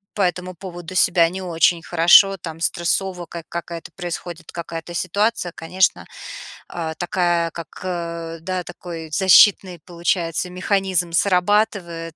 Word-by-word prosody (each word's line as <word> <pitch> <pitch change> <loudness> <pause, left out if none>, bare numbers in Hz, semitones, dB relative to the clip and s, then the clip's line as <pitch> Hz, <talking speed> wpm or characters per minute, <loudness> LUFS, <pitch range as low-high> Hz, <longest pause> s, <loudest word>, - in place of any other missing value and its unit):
по 205 - -1
этому 180 0 -1
поводу 175 -1 -9
себя 175 -2 +4
не 190 +2 -6
очень 170 -1 +2
хорошо, 175 +4 +5
там, 165 -2 -8
стрессово, 175 +2 -1
как 170 0 -9
какая-то 170 -1 -6
происходит 175 -1 -6
какая-то 170 0 -7
ситуация, 200 +2 0
конечно, 180 +3 0 0.6
а 160 -2 -5
такая 175 -2 0
как, 165 -2 -8 0.2
э, 170 -2 -5
да, 185 +1 -3
такой 165 -3 -9
защитный 190 +1 +5
получается 170 0 -1
механизм 185 -1 0
срабатывает, 180 -3 +1
175 Hz, 125 wpm, -21 LUFS, 165-185 Hz, 0.6 s, хорошо